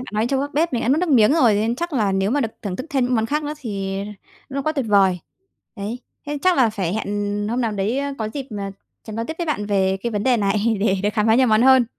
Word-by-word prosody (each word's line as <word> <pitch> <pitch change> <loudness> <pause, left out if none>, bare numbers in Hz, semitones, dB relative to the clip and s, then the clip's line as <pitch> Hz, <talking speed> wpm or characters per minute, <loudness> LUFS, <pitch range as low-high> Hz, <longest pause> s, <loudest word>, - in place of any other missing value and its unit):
bạn 250 - -9
nói 215 +2 +1
trâu 270 +1 0
gác 285 +1 -4
bếp 325 0 +1
mình 240 - -1
đã - - -1
nuốt 280 +4 +4
nước 360 - 0
miếng 240 -3 +5
rồi, 245 -10 +4
nên 220 +3 +1
chắc 345 +3 -3
là 230 -6 +1
cái 195 - +1
nếu 195 +2 +1
mà 290 - +1
được 230 - 0
thưởng 195 -3 -3
thức 255 - -6
thêm 265 -3 +1
những 250 - 0
món 225 -1 +1
khác 300 +4 -1
nữa 295 - -3
thì 195 -6 -4 0.5
nó 275 0 -3
quá 310 - 0
tuyệt 275 -6 -2
vời. 195 -3 +4 0.6
Đấy, 210 +4 -4 0.3
thế 295 0 -3
chắc 270 -12 +3
phải 190 -2 -1
hẹn 205 -1 -2
hôm 245 +2 0
nào 225 -3 0
đấy, 205 +6 -1
ơ, 280 0 -2
có 215 -1 -2
dịp, 275 -2 -4
ờ, 200 - -3 0.4
sẽ 220 - -8
nói 230 +1 -3
tiếp 320 - -3
với 345 - -2
bạn 210 -9 -2
về 190 -2 +1
cái 235 -1 -2
vấn 205 -1 -1
đề 250 0 +3
này, 210 +2 +1
để 195 -2 +2
được 205 - +2
khám 210 -1 +1
phá 220 - +5
nhiều 255 +1 +4
món 215 +1 +4
hơn, 260 -2 +6
225 Hz, 295 wpm, -21 LUFS, 205-270 Hz, 0.6 s, hơn